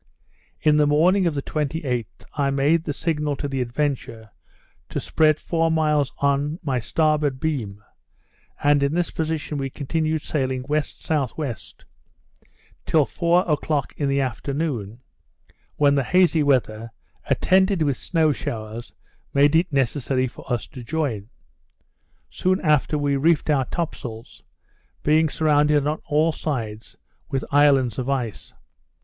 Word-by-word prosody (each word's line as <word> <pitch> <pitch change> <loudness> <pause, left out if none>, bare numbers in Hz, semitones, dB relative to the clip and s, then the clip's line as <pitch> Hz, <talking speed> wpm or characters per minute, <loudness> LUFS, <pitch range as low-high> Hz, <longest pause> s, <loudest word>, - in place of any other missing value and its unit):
In 150 -1 +4
the 150 -1 +4
morning 175 +6 +3
of 160 - -1
the 140 - -2
28th 140 - -3
I 140 -2 0
made 145 +4 +2
the 150 - -1
signal 150 -1 -1
to 145 - -4
the 135 -2 -2
Adventure 120 -3 -3 0.6
to - - -3
spread 155 -1 +2
four 165 -1 0
miles 150 -3 +1
on 140 +2 0
my 135 -5 0
starboard 150 +1 +1
beam; 115 -11 -3 0.8
and 145 0 +4
in 140 +3 +1
this 175 -1 0
position 160 -2 -3
we 135 0 -2
continued 155 +3 -2
sailing 130 -3 -2
W.S.W., 150 -1 -2 1.3
until 155 -3 +2
four 175 +4 +1
o'clock 150 -3 -1
in 145 -2 -1
the 140 0 +1
afternoon, 130 -3 -3 0.7
when 145 -1 +4
the 140 -1 +2
hazy 175 +1 +3
weather, 115 -5 +1 0.4
attended 190 -2 +3
with 140 -3 +1
snow 160 +2 +1
showers, 110 -3 -6 0.4
made 145 +2 +5
it 170 +1 +2
necessary 130 -1 0
for 125 - -11
us 120 -3 -1
to 130 -5 -10
join. 120 -8 -2 1.0
Soon 185 +1 +1
after 150 -1 +2
we 145 -1 +1
reefed 155 +1 +2
our 135 -3 +2
top 170 +3 -3
sails, 115 -1 -9 0.6
being 155 +1 +3
surrounded 150 -1 +2
on 150 +1 -1
all 155 +1 +2
sides 115 -9 -5 0.3
with 135 - -2
islands 135 -5 +4
of 130 +1 -3
ice. 125 -6 -3
145 Hz, 135 wpm, -23 LUFS, 130-155 Hz, 1.3 s, made